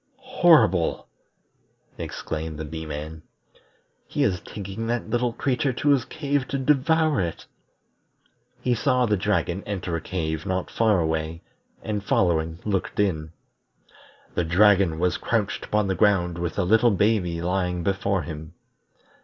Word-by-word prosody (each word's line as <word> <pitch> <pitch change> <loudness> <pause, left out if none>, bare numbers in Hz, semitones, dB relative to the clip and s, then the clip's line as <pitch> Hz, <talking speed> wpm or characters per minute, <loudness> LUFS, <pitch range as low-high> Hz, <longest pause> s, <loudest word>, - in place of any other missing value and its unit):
"Horrible!" 95 - +4 0.9
exclaimed 80 0 -5
the 80 - -5
Bee 80 +1 -6
man. 75 +1 -6 0.9
"He - - 0
is 90 -3 +1
taking 100 +2 -6
that 120 +1 -2
little 120 0 +1
creature 130 +2 0
to 145 +4 0
his 135 -3 +3
cave 145 -1 -2
to 140 - -2
devour 150 - +2
it." 85 -2 -4 1.2
He 125 - +1
saw 125 +2 +2
the 105 -2 +2
dragon 95 -2 0
enter 95 -4 -3
a 85 - -3
cave 80 -2 -3
not 95 -1 -2
far 110 -4 +3
away, 80 0 -2 0.4
and 105 -2 -3
following 80 -4 +1
looked 100 -2 -2
in. 80 -6 0 1.0
The 90 - 0
dragon 95 -1 +4
was 90 +2 +1
crouched 110 -4 -1
upon 105 -1 +1
the 95 - 0
ground 90 -4 +2
with 85 -2 -3
the 100 - 0
little 110 +5 +4
baby 100 -5 +1
lying 90 0 -1
before 95 0 0
him. 80 -1 -8
95 Hz, 140 wpm, -24 LUFS, 85-115 Hz, 1.2 s, Horrible